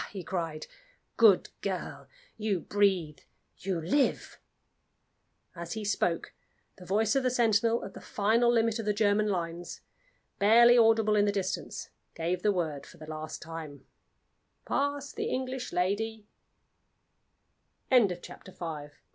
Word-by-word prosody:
he 195 -3 -7
cried. 165 -4 -4 0.5
"Good 215 -5 +5
girl! 190 -2 -4 0.3
you 210 -4 -1
breathe 185 -8 +1 0.4
you 185 -2 -2
live!" 225 - 0 1.2
As 170 0 -6
he 220 -1 -5
spoke, 175 -4 -1 0.5
the 180 - -12
voice 215 +4 +2
of 270 - +3
the 255 - +1
sentinel 230 -1 +2
at - - -9
the - - -10
final 230 +2 +2
limit 230 -1 +2
of 225 - -4
the 210 - +2
German 210 0 +2
lines 175 -3 -4 0.6
(barely 235 +4 +7
audible 225 -2 +4
in 205 0 +4
the 205 - +2
distance) 195 -2 -4 0.2
gave 170 +2 -2
the 210 - +3
word 160 -7 -3
for 180 - -15
the 155 - -10
last 155 0 -7
time: 160 -4 -8 0.8
"Pass 285 0 -1
the - - -3
English 255 0 -3
lady!" 210 +4 -1 1.7
SECOND 245 -6 +6
SCENE. 180 - -4
Mablethorpe 190 - -13
House. 150 -4 -5
205 Hz, 140 wpm, -29 LUFS, 170-225 Hz, 1.7 s, barely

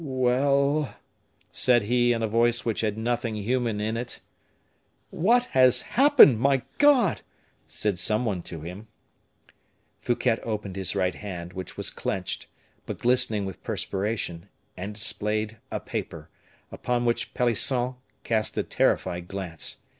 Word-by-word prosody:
"Well," 140 +2 +1 0.6
said 120 -3 +3
he, 120 +3 +2
in 115 -1 0
a - - +1
voice 120 +2 +2
which 115 -2 -1
had 105 -1 -1
nothing 115 0 -1
human 115 +1 -1
in 110 +2 -2
it. 120 +1 -5 0.9
"What 240 +8 +3
has 130 -1 +5
happened, 265 - +6
my 135 0 +2 0.2
God!" 290 -4 +4 0.5
said 85 +4 -1
some 105 +6 +2
one 100 -6 -1
to 85 -2 -8
him. 90 +7 -8 1.1
Fouquet 120 -1 0
opened 105 -4 -4
his 95 0 0
right 90 -2 +1
hand, 90 -3 -7
which 95 -2 -7
was - - -2
clenched, 95 -2 -4 0.4
but - - -4
glistening 120 -4 +1
with 95 -1 -7
perspiration, 100 -3 -3 0.3
and 100 +3 -6
displayed 110 +1 -1
a - - -3
paper, 80 0 -6 0.4
upon 120 0 -1
which 120 -1 -1
Pelisson 125 +1 +1 0.3
cast 110 -2 0
a - - +1
terrified 85 0 0
glance. 95 -4 -5
115 Hz, 135 wpm, -26 LUFS, 100-125 Hz, 1.1 s, happened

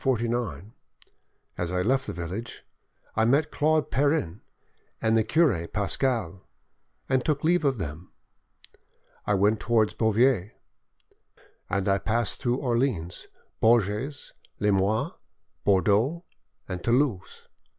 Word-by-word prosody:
As 90 0 -2
I 90 0 0
left 135 +5 +1
the - - -4
village, 90 +7 -6 0.5
I 110 - +2
met 140 +6 +2
Claude 155 0 +1
Perrin 140 - 0 0.6
and 110 0 +2
the 110 - +4
cure 110 - +2
Pascal, 100 -2 -1 0.6
and 130 -1 +1
took 150 -3 -1
leave 175 +1 +3
of 135 -3 +1
them. 80 -1 -6 1.2
I 105 - +3
went 105 +2 +2
towards 110 -2 +2
Beauvais, 110 -2 +2 1.2
end 100 +1 -1
I 100 0 +3
passed 110 +2 -1
through 120 0 +1
Orleans, 120 - -1 0.3
Bourges, 115 +4 +1 0.3
Limoges, 100 +1 +1 0.5
Bordeaux, 105 - +2 0.4
and 90 -2 -5
Toulouse. 120 -6 0
110 Hz, 110 wpm, -26 LUFS, 95-135 Hz, 1.2 s, the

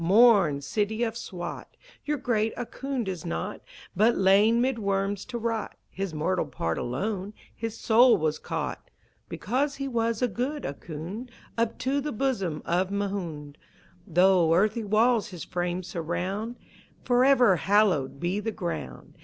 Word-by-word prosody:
Mourn, 195 -6 +5
city 210 - -1
of 225 -1 -1
Swat! 175 -6 -7 0.3
Your 300 0 0
great 225 -4 0
Ahkoond 250 0 -4
is 180 -4 -4
not, 80 0 -4 0.3
But 220 +5 +4
lain 205 +5 +5
'mid 250 -1 +1
worms 200 -1 -1
to 250 -1 -5
rot. 225 -2 -2 0.2
His 195 -1 -3
mortal 160 +2 -1
part 85 - -2
alone, 195 - -3 0.2
his 225 0 -5
soul 240 +2 +5
was 155 -1 -1
caught - - -4 0.4
(Because 275 +5 -1
he 275 0 -4
was 230 -2 0
a - - +4
good 255 +7 -3
Ahkoond) 170 - -6 0.3
Up 230 0 0
to 275 +2 0
the 300 +2 -3
bosom 205 - -1
of 180 +2 +1
Mahound. 180 -8 -4 0.5
Though 180 -2 +4
earthy 215 +5 +2
walls 220 +2 +3
his 180 -4 -8
frame 175 0 -2
surround 180 +7 -3 0.5
(Forever 245 -5 +5
hallowed 175 -6 +2
be 180 +5 -1
the 225 +2 -2
ground!) 170 - -6
205 Hz, 145 wpm, -27 LUFS, 175-235 Hz, 0.5 s, Mourn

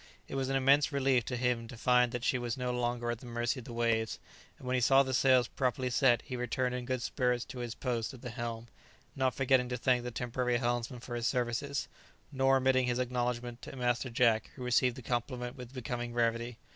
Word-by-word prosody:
It - - -9
was 135 -1 -1
an 135 - 0
immense 140 +3 +4
relief 135 -4 +2
to 125 - -3
him 120 -2 0
to 120 - -10
find 125 +1 +3
that 120 -1 -4
she 125 - +1
was 120 -1 -3
no 125 -1 -1
longer 120 -1 -1
at 120 - -4
the 125 - -11
mercy 120 +2 -1
of 120 - -11
the - - -8
waves, 115 -1 0 0.4
and - - -13
when 125 - -1
he 130 - +2
saw 135 +3 +6
the 130 -1 -3
sails 130 -2 +4
properly 130 0 -1
set 120 -2 +3
he 130 - -6
returned 125 +1 -1
in 125 -1 -4
good 130 -1 -2
spirits 125 -2 0
to 125 - -8
his 120 -2 -4
post 120 -4 -2
at 130 -2 -13
the 125 - -5
helm, 120 -1 -5 0.5
not 130 -2 +1
forgetting 130 -2 +3
to 125 - -2
thank 125 +1 +2
the 125 - -3
temporary 125 +1 -1
helmsman 120 0 -2
for 120 - -7
his 120 0 -1
services, 125 +3 -1 0.4
nor 135 -1 +3
omitting 130 -1 +3
his 120 -1 0
acknowledgment 125 -1 -2
to - - -9
Master 125 0 0
Jack, 115 -2 +2
who 130 - -7
received 125 0 +2
the 130 - -9
compliment 125 +1 -3
with 125 -2 -9
becoming 120 -2 -4
gravity. 115 0 0
125 Hz, 225 wpm, -32 LUFS, 120-130 Hz, 0.5 s, saw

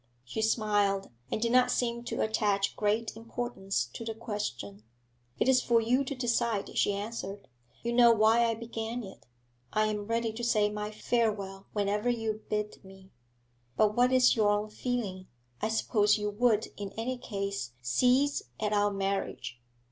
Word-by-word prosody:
She 220 - -3
smiled, 205 - +1 0.2
and - - 0
did 230 +1 0
not 250 0 +5
seem 235 -1 0
to - - -1
attach 205 -3 +1
great 215 +2 0
importance 225 - -3
to - - -6
the 225 -1 -4
question. 205 - -5 0.6
'It - - +1
is 260 -1 +5
for 235 -1 +3
you 245 +4 +2
to 280 - -4
decide,' 235 -4 0
she 205 - +2
answered. 200 -1 -5 0.4
'You 235 0 -1
know 235 -1 +7
why 225 +1 +4
I 230 -1 +1
began 230 +1 -5
it; 190 -8 -12 0.4
I 215 0 +2
am 210 -1 -3
ready 230 -1 0
to 240 +2 -6
say 210 -3 +2
my 210 0 -4
farewell 210 -3 -1
whenever 210 +2 0
you 225 -2 -1
bid 210 0 -3
me.' 190 0 -15 0.7
'But 210 -1 +3
what 245 +1 +4
is 255 -1 +5
your 215 -3 +3
own 205 +1 +1
feeling? 210 -7 -3 0.3
I 215 - 0
suppose 210 -1 +2
you 210 0 -2
would 220 0 +2
in 200 -1 -6
any 245 +3 -3
case 200 - -4
cease 255 - +3 0.2
at 210 0 0
our 205 0 +3
marriage?' 195 -11 -3
215 Hz, 165 wpm, -30 LUFS, 205-235 Hz, 0.7 s, know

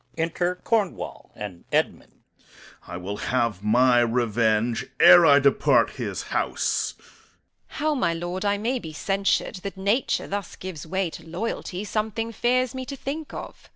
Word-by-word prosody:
Enter 175 +2 0
Cornwall 210 0 -2
and 95 -4 -7
Edmund. - - -1 0.6
Corn. 90 - -12
I - - -4
will 95 +3 -5
have 115 -6 -1
my 120 +3 +4
revenge 115 -1 +1
ere 175 -2 +9
I 140 - +7
depart 140 -1 +3
his - - -4
house. - - 0
Edm. - - -24 0.6
How, 310 0 -1
my 255 -11 +1
lord, 175 +3 -4
I 205 0 +1
may 240 +5 -1
be 160 -7 -8
censured, 195 +4 0
that 195 +1 -7
nature 205 +7 0
thus 200 -1 -4
gives 175 -5 -8
way 190 0 -1
to 165 +1 -11
loyalty, 185 0 -4
something 220 +2 -2
fears 255 +2 +1
me 260 0 -4
to 280 - -5
think 285 +3 -5
of. - - -9
180 Hz, 155 wpm, -25 LUFS, -, 0.6 s, ere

